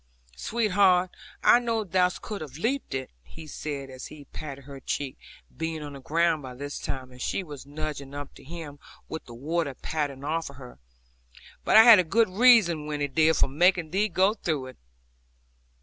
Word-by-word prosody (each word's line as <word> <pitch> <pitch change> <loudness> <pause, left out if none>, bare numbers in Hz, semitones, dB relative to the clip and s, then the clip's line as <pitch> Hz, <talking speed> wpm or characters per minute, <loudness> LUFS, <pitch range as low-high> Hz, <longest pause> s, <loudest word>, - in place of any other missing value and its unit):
'Sweetheart, 190 - +2 0.3
I 240 - +7
know 230 -2 -1
thou 185 -2 +2
couldst 205 +3 -7
have 145 -3 -8
leaped 240 - -2
it,' 130 0 -4
he 155 - -12
said, 140 -2 -6
as 130 0 -8
he 150 -2 -12
patted 140 -1 -8
her 140 0 -10
cheek, 135 +1 -3 0.4
being 160 -1 -4
on 145 -1 -7
the 140 - -9
ground 165 +3 +1
by 130 -2 -8
this 145 +2 -6
time, 130 -1 -5
and 125 0 -13
she 195 - -1
was 145 -5 -10
nudging 145 -2 -6
up 145 -1 -7
to - - -15
him, 150 -1 -8 0.3
with 160 - -6
the 120 - -11
water 145 +2 -2
pattering 145 -3 -3
off 160 +3 -2
her; 130 - -12 0.8
'but - - +5
I 220 - +11
had 210 -8 +8
good 225 +3 +3
reason, 190 -8 +5
Winnie 145 -1 -1
dear, 160 +3 +3
for - - +3
making 170 +3 +2
thee 205 +4 +1
go 190 +3 +3
through 155 -10 -2
it.' 130 - -14
155 Hz, 180 wpm, -27 LUFS, 140-180 Hz, 0.8 s, I